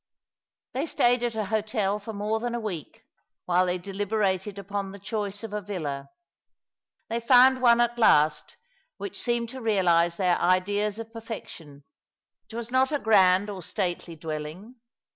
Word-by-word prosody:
They 275 +5 -2
stayed 245 -4 +2
at 240 -2 -2
a 215 -1 -1
hotel 210 -1 -1
for 210 +2 -7
more 215 +1 -2
than 240 +1 -3
a - - -2
week, 190 -9 -6 0.4
while 180 +1 +2
they 180 0 0
deliberated 200 +1 -2
upon 200 0 -4
the 200 - -9
choice 205 0 -4
of 220 -2 -7
a 210 - -2
villa. 155 -9 -5 1.0
They 230 - -2
found 255 +2 +6
one 235 -1 +5
at 240 0 +1
last, 150 -8 +3 0.4
which 395 - -6
seemed 235 -1 -1
to 260 +1 -8
realize 175 -6 +2
their 180 -3 +2
ideas 200 +4 +1
of 225 0 -8
perfection. 175 -11 -9 0.7
It 225 - -10
was 235 0 -5
not 260 +2 +3
a 295 - +1
grand 195 -5 +4
or 190 -2 -7
stately 175 -2 -3
dwelling. 160 +9 -7
205 Hz, 160 wpm, -26 LUFS, 185-230 Hz, 1.0 s, found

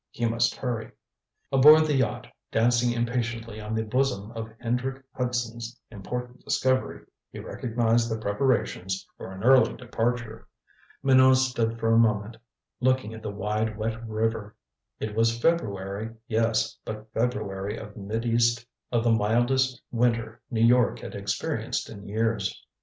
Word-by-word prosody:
He 120 - -2
must 115 +1 +1
hurry. 120 -4 -4 0.6
Aboard 150 +4 +8
the 150 - +1
yacht, 130 -6 0 0.3
dancing 120 +1 +3
impatiently 115 -2 -2
on 105 +1 -4
the 110 - 0
bosom 115 -2 -1
of 115 -1 -6
Hendrick 130 +3 -2
Hudson's 120 -1 -3
important 125 +4 -6
discovery, 130 0 0 0.3
he - - -9
recognized 115 0 0
the 110 - -1
preparations 100 -4 -1
for - - -8
an 95 +1 -8
early 130 -2 +5
departure. 120 -2 -3 0.6
Minot 130 -1 +6
stood 120 -3 0
for 115 0 +2
a 115 - +6
moment 110 0 +1 0.4
looking 130 -3 +1
at 110 - -9
the 105 - -4
wide 105 +2 -2
wet 115 +1 -3
river. 110 -1 -2 0.4
It 110 -1 -3
was 115 +1 +2
February, 110 - -1
yes, 115 -1 +1
but 110 0 -7
February 105 -4 -2
of 105 -2 -9
the 115 +2 0
mildest 120 +4 +2
winter 115 -1 0
New 115 -2 +2
York 125 +1 +4
had - - -8
experienced - - -2
in 100 0 -10
years. 110 -1 -1
115 Hz, 135 wpm, -26 LUFS, 110-125 Hz, 0.6 s, Aboard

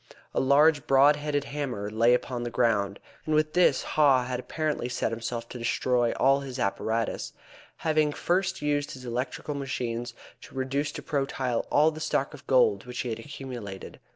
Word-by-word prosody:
A - - +1
large 145 +2 +4
broad 140 +2 +6
headed 145 -1 -1
hammer 125 -9 -4
lay 115 +3 +4
upon 125 -1 -3
the 120 - -3
ground, 105 -5 +1 0.2
and 155 - 0
with 155 0 +2
this 180 +1 +4
Haw 135 -5 +3
had 125 0 -3
apparently 150 -2 -2
set 125 - -1
himself 115 +1 -4
to 125 - -7
destroy 120 0 +1
all 135 +1 +3
his 135 -2 -7
apparatus, 110 +1 -1 0.4
having 155 -1 +1
first 190 +3 -1
used 145 -1 0
his 130 -1 -10
electrical 125 +4 -3
machines 120 -4 -3 0.3
to - - -14
reduce 135 +3 -1
to - - -7
protyle 135 -4 -1
all 155 +2 +4
the 155 - -8
stock 155 - -1
of - - -13
gold 475 - +3
which 125 - -4
he 125 - -4
had 110 - -4
accumulated. 125 -10 -8
130 Hz, 175 wpm, -27 LUFS, 120-150 Hz, 0.4 s, broad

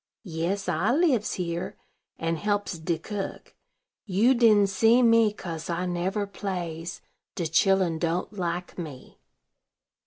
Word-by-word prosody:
"Yes: 180 +2 -2
I 180 +6 +1
lives 275 - +2
here, 170 -1 -3 0.4
and 165 0 -1
helps 205 -4 -1
de 165 +1 -1
cook. 200 +4 -6 0.5
You 210 +7 +4
didn't 215 -5 +5
see 230 +5 +4
me, 230 -2 +5
kase 170 -6 -7
I 175 +1 -1
never 185 +4 -1
plays; 175 -4 -5 0.3
de 170 - -2
chilen 180 0 +2
don't 170 +4 -1
like 180 -2 -4
me." 150 -7 -9
185 Hz, 125 wpm, -26 LUFS, 170-210 Hz, 0.5 s, didn't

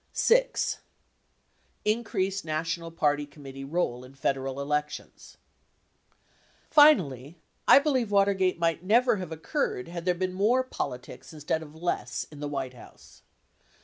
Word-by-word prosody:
VI. - - +4 1.4
Increased 205 -3 0
national 165 +2 -3
party 150 -3 0
committee 135 -2 -10
role 135 -4 -2
in 130 +1 -14
Federal 135 0 -2
elections. 150 +1 -4 1.3
Finally, 170 - +5 0.3
I - - +9
believe 270 -6 +2
Watergate 195 -2 +2
might 165 -1 0
never 230 +4 +3
have 180 -4 -6
occurred 155 -3 -2
had 170 0 -6
there 180 -1 +2
been 185 +1 -2
more 220 +7 +2
politics 125 - -6
instead 155 +1 -2
of 155 -1 -11
less 160 -7 -2
in 150 - -11
the 145 0 -4
White 135 -3 -4
House. 120 - -16
165 Hz, 125 wpm, -27 LUFS, 145-195 Hz, 1.4 s, I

